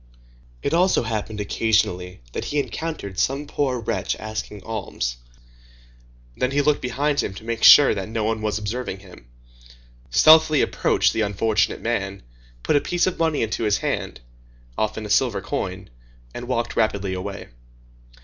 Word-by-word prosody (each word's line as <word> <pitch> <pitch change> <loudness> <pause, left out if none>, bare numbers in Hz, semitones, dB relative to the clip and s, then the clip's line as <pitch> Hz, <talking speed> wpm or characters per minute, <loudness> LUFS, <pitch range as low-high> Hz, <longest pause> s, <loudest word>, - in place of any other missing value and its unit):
It 140 - -1
also 180 -4 +3
happened 110 -1 -4
occasionally 100 - 0
that - - -4
he 150 - -3
encountered 140 -7 -4
some 140 +3 0
poor 140 -3 -1
wretch 100 -3 -2
asking 105 -2 -6
alms; 65 - -4 1.2
then 125 - 0
he 145 +1 +1
looked 150 0 +2
behind 140 +4 0
him 95 - -5
to 110 - -10
make 115 0 -4
sure 145 - +9
that 100 -1 -5
no 110 -1 -2
one 110 0 -1
was 105 -1 -1
observing 105 -2 -4
him, 90 -11 -15 0.8
stealthily 155 - +6
approached - - +1
the - - 0
unfortunate 105 +1 0
man, 100 -4 -2 0.4
put - - +1
a 145 - +4
piece 175 -1 0
of 185 - -2
money 160 -5 +1
into 110 +1 -2
his 105 -2 +2
hand, - - -3 0.5
often 110 - -2
a - - -7
silver 105 -1 +2
coin, 95 -1 -4 0.5
and 120 - -7
walked 120 -2 -2
rapidly 100 -3 0
away. 90 0 -6
110 Hz, 155 wpm, -23 LUFS, 100-135 Hz, 1.2 s, sure